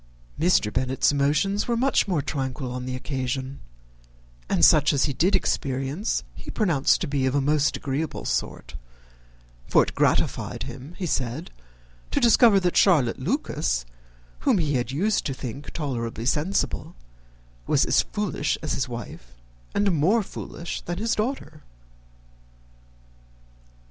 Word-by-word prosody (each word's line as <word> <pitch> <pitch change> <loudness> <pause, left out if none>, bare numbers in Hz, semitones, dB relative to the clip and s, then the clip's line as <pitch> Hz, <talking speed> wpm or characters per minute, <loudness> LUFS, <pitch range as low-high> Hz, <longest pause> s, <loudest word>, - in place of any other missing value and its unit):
Mr. 160 -11 +2
Bennet's 130 +2 +1
emotions 150 +9 +1
were 235 -1 +1
much 265 -1 +2
more 170 -7 0
tranquil 130 -2 -3
on 125 0 -5
the 130 - -3
occasion, 130 0 -4 0.9
and 85 - +5
such 150 -1 +5
as 140 - +2
he 145 - -2
did 180 +9 +2
experience 135 - -1
he - - -11
pronounced 170 - +2
to 175 - -1
be 140 -2 0
of 130 - 0
a - - +3
most 145 +1 +1
agreeable 145 +3 -3
sort; - - -3 0.9
for - - +5
it - - -5
gratified - - 0
him, 145 +7 -9
he 190 - -3
said, 135 +1 -2 0.6
to - - 0
discover 230 -3 +6
that 180 -2 0
Charlotte 150 - +4
Lucas, 150 - -1 0.5
whom - - +2
he 155 -4 0
had 120 -3 0
been 135 +3 -5
used 210 +5 +1
to 135 - -3
think 135 +3 -7
tolerably 115 -6 -4
sensible, 155 +9 -1 0.7
was - - +3
as - - +4
foolish - - -2
as - - -1
his - - -2
wife, - - -8 0.4
and 200 -1 +3
more 180 +8 +3
foolish 170 -2 -6
than 175 0 -5
his 225 +3 0
daughter! 210 - -3
145 Hz, 145 wpm, -25 LUFS, 130-180 Hz, 0.9 s, discover